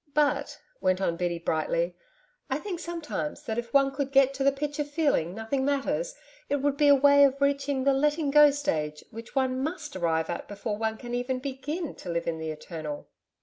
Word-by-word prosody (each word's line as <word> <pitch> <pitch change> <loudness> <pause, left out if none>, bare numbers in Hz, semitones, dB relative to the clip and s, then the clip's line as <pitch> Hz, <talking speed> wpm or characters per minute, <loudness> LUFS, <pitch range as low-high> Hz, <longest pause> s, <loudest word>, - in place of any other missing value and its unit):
'But,' 290 -1 +1 0.2
went 185 0 +2
on 170 -3 0
Biddy 175 0 -1
brightly, - - -1 0.5
'I 265 - 0
think 355 +2 -5
sometimes 335 -3 -4
that 220 0 -2
if 235 0 -6
one 275 -1 +4
could 275 0 -3
get 275 0 +5
to 270 0 -2
the 275 - +5
pitch 290 +2 -4
of 290 0 -1
feeling 290 - +1
nothing 225 +5 -2
matters, 285 - -1 0.3
it 285 - +2
would 285 0 0
be 295 0 +3
a 285 - +8
way 285 +1 +6
of 275 0 +3
reaching 280 -1 +1
the 275 0 +4
"letting 295 +1 +1
go" 295 0 +8
stage 155 - -2
which 230 +2 -10
one 260 -1 +1
MUST 315 - -4
arrive 165 -3 0
at 170 - -5
before 205 +1 -4
one 220 +1 -2
can 240 +1 -7
even 250 +1 -1
BEGIN 280 +5 -4
to - - -8
live 170 0 -1
in 165 -1 -2
the 160 0 -4
Eternal.' 155 -1 -6
270 Hz, 205 wpm, -27 LUFS, 210-290 Hz, 0.5 s, a